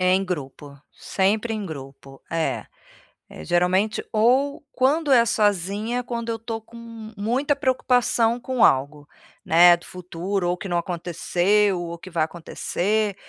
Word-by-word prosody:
Em 185 Hz, +1 st, +3 dB
grupo, 145 Hz, -4 st, -7 dB
sempre 210 Hz, +4 st, 0 dB
em 210 Hz, -2 st, -4 dB
grupo, 135 Hz, -2 st, -10 dB
é. 165 Hz, -1 st, -2 dB, 0.6 s
É, -, -, -10 dB
geralmente 180 Hz, +5 st, +1 dB
Ou, 255 Hz, +6 st, +2 dB
quando 290 Hz, +4 st, +1 dB
é 240 Hz, -3 st, +7 dB
sozinha, 210 Hz, +3 st, 0 dB
quando 235 Hz, -1 st, -4 dB
eu 225 Hz, -, -1 dB
tô 225 Hz, 0 st, -5 dB
com 225 Hz, +2 st, -18 dB, 0.4 s
muita 255 Hz, +8 st, 0 dB
preocupação 245 Hz, -3 st, +1 dB
com 250 Hz, -1 st, 0 dB
algo, 145 Hz, +2 st, +1 dB, 0.4 s
né, 175 Hz, +2 st, +7 dB
do 170 Hz, -, -16 dB
futuro, 180 Hz, +1 st, -3 dB
ou 180 Hz, -, -1 dB
que 195 Hz, -, -7 dB
não 175 Hz, -, 0 dB
aconteceu, 180 Hz, +3 st, 0 dB
ou 170 Hz, 0 st, -6 dB
que 185 Hz, -, -11 dB
vai 165 Hz, -2 st, +1 dB
acontecer, 195 Hz, +5 st, -2 dB
195 Hz, 140 wpm, -23 LUFS, 175-230 Hz, 0.6 s, é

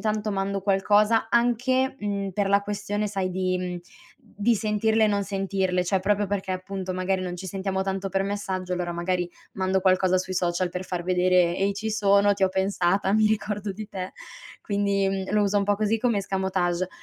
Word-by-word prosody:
tanto 215 Hz, -1 st, -1 dB
mando 195 Hz, 0 st, -1 dB
qualcosa 210 Hz, +3 st, +3 dB
anche, 250 Hz, +3 st, +2 dB
mhmm, 200 Hz, -1 st, -2 dB
per 200 Hz, +1 st, 0 dB
la 200 Hz, 0 st, +3 dB
questione 205 Hz, +1 st, -2 dB
sai 195 Hz, -2 st, -2 dB
di 185 Hz, 0 st, 0 dB
mhmm, 180 Hz, -1 st, -4 dB, 0.5 s
di 220 Hz, +3 st, +1 dB
sentirle 220 Hz, +1 st, +2 dB
e -, -, +4 dB
non 205 Hz, -1 st, +1 dB
sentirle, 195 Hz, -2 st, -1 dB
cioè 190 Hz, +1 st, +1 dB
proprio 205 Hz, +2 st, +1 dB
perché 195 Hz, -1 st, -3 dB
appunto 185 Hz, 0 st, -4 dB
magari 185 Hz, +1 st, -1 dB
non 180 Hz, -1 st, -4 dB
ci 190 Hz, +2 st, -7 dB
sentiamo 190 Hz, +1 st, -2 dB
tanto 195 Hz, 0 st, -2 dB
per 195 Hz, 0 st, 0 dB
messaggio, 190 Hz, -2 st, -3 dB
allora 180 Hz, -1 st, -2 dB
magari 175 Hz, 0 st, -1 dB, 0.2 s
mando 190 Hz, 0 st, 0 dB
qualcosa 185 Hz, 0 st, +3 dB
sui 185 Hz, 0 st, -4 dB
social 175 Hz, 0 st, 0 dB
per 180 Hz, +2 st, -5 dB
far 175 Hz, -2 st, -4 dB
vedere: 180 Hz, -1 st, +3 dB
"Ehi 195 Hz, +1 st, +1 dB
ci 220 Hz, +2 st, -3 dB
sono 200 Hz, -1 st, +4 dB
ti 195 Hz, -, -5 dB
ho 190 Hz, -, +5 dB
pensata 190 Hz, 0 st, +1 dB
mi 215 Hz, 0 st, +4 dB
ricordo 210 Hz, -1 st, -2 dB
di 210 Hz, +2 st, -6 dB
te." 185 Hz, -3 st, -6 dB, 0.5 s
Quindi, 200 Hz, -1 st, 0 dB
mhmm, 195 Hz, -1 st, -3 dB
lo 210 Hz, -1 st, +3 dB
uso 205 Hz, 0 st, +2 dB
un -, -, +1 dB
po' 205 Hz, 0 st, +1 dB
così 215 Hz, +2 st, +1 dB
come 235 Hz, -1 st, +1 dB
escamotage 185 Hz, -2 st, -1 dB
195 Hz, 195 wpm, -25 LUFS, 185-205 Hz, 0.5 s, ho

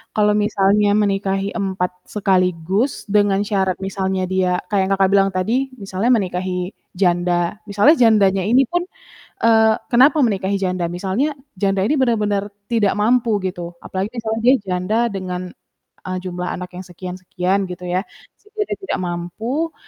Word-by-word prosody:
Kalau 210 Hz, -1 st, +3 dB
misalnya 205 Hz, 0 st, +2 dB
menikahi 195 Hz, -1 st, 0 dB
4 190 Hz, -3 st, -2 dB, 0.2 s
sekaligus 190 Hz, -, 0 dB
dengan 205 Hz, -1 st, +3 dB
syarat 190 Hz, -3 st, 0 dB
misalnya 190 Hz, -1 st, -2 dB
dia 185 Hz, -1 st, +1 dB
kayak 190 Hz, -1 st, +1 dB
Kakak 190 Hz, -1 st, +3 dB
bilang 195 Hz, 0 st, +4 dB
tadi, 230 Hz, +9 st, 0 dB
misalnya 195 Hz, +4 st, -1 dB
menikahi 180 Hz, -3 st, -1 dB, 0.2 s
janda 175 Hz, -1 st, +1 dB
misalnya 205 Hz, +11 st, +5 dB
jandanya 200 Hz, -5 st, +4 dB
ini 250 Hz, +5 st, +5 dB
pun 350 Hz, 0 st, -1 dB, 0.6 s
eee, 220 Hz, -1 st, +5 dB, 0.2 s
kenapa 275 Hz, +6 st, +5 dB
menikahi 200 Hz, -3 st, 0 dB
janda? 185 Hz, -3 st, -1 dB
Misalnya 195 Hz, -, -1 dB, 0.2 s
janda 195 Hz, -1 st, +1 dB
ini 270 Hz, -, +2 dB
benar-benar 210 Hz, -5 st, +1 dB, 0.2 s
tidak 215 Hz, -4 st, +2 dB
mampu 230 Hz, +3 st, +2 dB
gitu, 175 Hz, -2 st, -5 dB
apalagi 190 Hz, +2 st, -3 dB
misalnya 225 Hz, -1 st, -2 dB
dia 255 Hz, -, +7 dB
janda 185 Hz, +4 st, -1 dB, 0.2 s
dengan, 185 Hz, -2 st, -4 dB, 0.7 s
eee, 185 Hz, 0 st, -3 dB
jumlah 180 Hz, -1 st, -4 dB
anak 180 Hz, 0 st, -6 dB
yang 185 Hz, -, -7 dB
sekian 180 Hz, +1 st, -8 dB
sekian 185 Hz, +1 st, -1 dB
gitu 180 Hz, -1 st, -8 dB
ya, 180 Hz, +1 st, +1 dB, 0.4 s
sehingga 425 Hz, +1 st, -7 dB
dia -, -, -2 dB
tidak 385 Hz, -, -4 dB
mampu 220 Hz, -, -3 dB
195 Hz, 145 wpm, -20 LUFS, 185-220 Hz, 0.7 s, dia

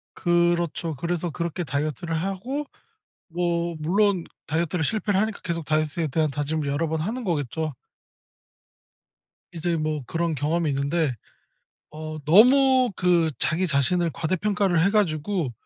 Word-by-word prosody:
그렇죠. 170 Hz, -2 st, +1 dB
그래서 170 Hz, +3 st, -2 dB
그렇게 170 Hz, +3 st, -3 dB
다이어트를 155 Hz, +3 st, -2 dB
하고 195 Hz, -, -3 dB, 0.6 s
뭐 170 Hz, 0 st, -1 dB
물론 185 Hz, +3 st, +2 dB, 0.2 s
다이어트를 165 Hz, +2 st, -1 dB
실패를 205 Hz, +1 st, +1 dB
하니까 215 Hz, -1 st, -2 dB
계속 170 Hz, -3 st, -3 dB
다이어트에 155 Hz, +1 st, 0 dB
대한 155 Hz, +1 st, +1 dB
다짐을 145 Hz, +1 st, -2 dB
여러 145 Hz, +3 st, 0 dB
번 160 Hz, 0 st, -1 dB
하는 230 Hz, +9 st, -3 dB
거겠죠. 155 Hz, -, -2 dB, 1.8 s
이제 170 Hz, +1 st, -1 dB
뭐 155 Hz, -3 st, -2 dB
그런 165 Hz, -1 st, -1 dB
경험이 155 Hz, +3 st, 0 dB
있는데 140 Hz, +1 st, 0 dB, 0.8 s
어 155 Hz, 0 st, -6 dB
너무 255 Hz, -, +6 dB
그 175 Hz, -3 st, +3 dB
자기 180 Hz, +4 st, +1 dB
자신을 165 Hz, +4 st, +1 dB
과대평가를 185 Hz, +1 st, +1 dB
해 195 Hz, -, +3 dB
가지고 175 Hz, -, 0 dB
170 Hz, 305 characters per minute, -25 LUFS, 155-185 Hz, 1.8 s, 너무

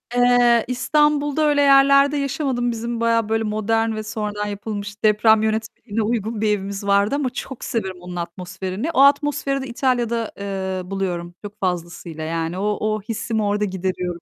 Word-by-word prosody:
Eee, 245 Hz, -1 st, +4 dB
İstanbul'da 295 Hz, +3 st, +1 dB
öyle 290 Hz, -1 st, +3 dB
yerlerde 275 Hz, +1 st, +5 dB
yaşamadım. 265 Hz, -3 st, -1 dB
Bizim 235 Hz, +1 st, -4 dB
bayağı 230 Hz, -2 st, +2 dB
böyle 225 Hz, 0 st, +1 dB
modern 220 Hz, +1 st, 0 dB
ve 215 Hz, -, -4 dB
sonradan 210 Hz, -1 st, -3 dB
yapılmış 205 Hz, 0 st, -6 dB
deprem 215 Hz, +1 st, +4 dB
yönetmeliğine 220 Hz, 0 st, -2 dB
uygun 220 Hz, 0 st, -2 dB
bir 215 Hz, -, +2 dB
evimiz 200 Hz, -1 st, -2 dB
vardı 200 Hz, +5 st, +3 dB
ama 285 Hz, -3 st, 0 dB
çok 270 Hz, +1 st, -7 dB
seviyorum 190 Hz, -6 st, -3 dB
onun 180 Hz, 0 st, -8 dB
atmosferini. 185 Hz, -, -4 dB
O 315 Hz, -, +3 dB
atmosferi 280 Hz, -1 st, +3 dB
de 265 Hz, -, -6 dB
İtalya'da, 235 Hz, -2 st, -1 dB
eee, 190 Hz, -2 st, -4 dB
buluyorum 175 Hz, -3 st, -3 dB
çok 205 Hz, +1 st, -9 dB
fazlasıyla. 170 Hz, -3 st, -4 dB
Yani 165 Hz, +2 st, -3 dB
o 210 Hz, +2 st, 0 dB
o 215 Hz, 0 st, 0 dB
hissimi 220 Hz, 0 st, -2 dB
orada 205 Hz, 0 st, +1 dB
gideriyorum. 185 Hz, -2 st, -3 dB
215 Hz, 155 wpm, -21 LUFS, 195-245 Hz, -, yerlerde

